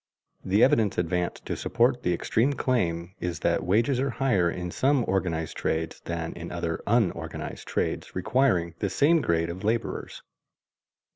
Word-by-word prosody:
The 100 +4 +3
evidence 115 -8 +3
advanced 90 0 -1
to - - -2
support 120 +1 +1
the 90 - 0
extreme 115 +10 +1
claim 90 -10 -1
is 85 -3 -3
that - - +1
wages 115 +7 +2
are 135 +1 +1
higher 115 -9 +2
in 90 0 -4
some 135 +2 +2
organized 85 -5 -1
trades 80 0 -2
than 85 -1 -3
in 85 0 -7
other 85 -2 -3
unorganized 110 -4 -1
trades - - -2
requiring 90 -4 +1
the - - 0
same 160 +3 +3
grade 85 -5 0
of 95 +3 -8
laborers. 115 +2 -2
95 Hz, 150 wpm, -27 LUFS, 85-125 Hz, -, The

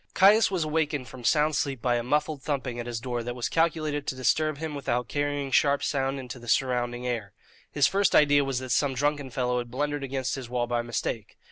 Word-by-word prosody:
Caius 205 +4 +6
was 185 -4 0
awakened 150 -4 -1
from 130 -2 -11
sound 150 +4 +3
sleep 140 -3 -1
by 120 +1 +1
a 120 - 0
muffled 150 +3 0
thumping 130 -4 -3
at 120 - -5
his 120 -1 -3
door 120 0 -3
that 120 +1 -5
was 125 - -2
calculated 155 -3 0
to - - -2
disturb 155 +4 +1
him 160 0 -4
without 125 -4 -2
carrying 145 -1 -2
sharp 140 +1 +3
sound 135 -1 -1
into 125 -1 -8
the 120 - -13
surrounding 120 -1 0
air. 115 -5 -3 0.4
His 145 -2 +3
first 200 0 +2
idea 145 -1 +5
was 135 -2 -2
that 130 0 -4
some 135 +1 +2
drunken 145 0 0
fellow 125 0 -1
had 120 -1 -6
blundered 145 +3 -2
against 130 -1 -2
his 130 -3 -5
wall 120 -1 0
by 120 0 -1
mistake. 115 -2 -4
135 Hz, 220 wpm, -27 LUFS, 120-145 Hz, 0.4 s, Caius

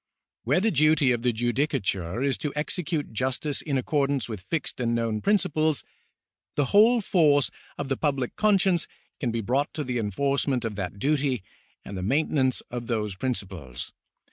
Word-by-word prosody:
Where 135 +8 +3
the 220 +3 +2
duty 155 -3 +4
of 120 -1 0
the 125 0 +2
judicatiu:e 115 - 0
is 135 - +1
to 150 - -2
execute 155 -2 -2
justice 130 +5 -1
in 140 -3 -1
accordance 140 -2 +1
Avith 110 -4 -6
fixed 145 - -3
and 120 -1 +1
known 115 -2 -1
principles, 155 -7 +2 0.7
the 145 - +2
whole 225 +3 +6
force 150 - +3 0.3
of 145 - -3
the 135 -1 -1
public 135 -5 -1
conscience 195 -5 +3 0.3
can 125 - -1
be 115 0 -1
brought 130 +7 0
to 150 - -2
the 125 -2 -2
enforcement 130 +4 0
of 110 -2 -3
that 100 0 -4
duty 135 -2 +1 0.4
and 100 - -7
the 95 - -4
maintenance 130 +3 +1
of 120 -1 -5
those 105 -4 -1
principles. 95 - -4
135 Hz, 165 wpm, -26 LUFS, 115-150 Hz, 0.7 s, whole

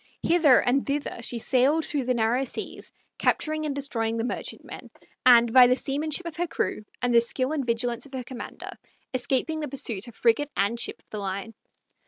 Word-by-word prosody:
Hither 320 -7 +5
and 260 +2 +1
thither 285 -3 -3
she 235 +1 -4
sailed 270 +7 +2
through 285 -4 -2
the 250 0 +1
narrow 235 +3 +1
seas, 265 - -6 0.3
capturing 310 0 +1
and 280 - -3
destroying 230 -5 -1
the 225 - -1
merchantmen, 245 - -6 0.4
and 235 -2 +7
by 255 -1 +9
the 250 - +3
seamanship 300 +6 -2
of 335 -2 -6
her 350 +1 -1
crew 215 - -2 0.2
and 245 -1 +2
the 235 - +7
skill 255 +3 -1
and 305 -3 -1
vigilance 240 +1 -2
of 275 - -20
her 255 - -4
commander, 250 0 -8 0.4
escaping 265 +5 0
the 300 - -3
pursuit 250 -7 -4
of 235 - -12
frigate 245 +5 +2
and 205 +4 +1
ship 230 - -2
of - - -46
the 215 - -4
line. 200 +2 -4
255 Hz, 195 wpm, -26 LUFS, 235-285 Hz, 0.4 s, by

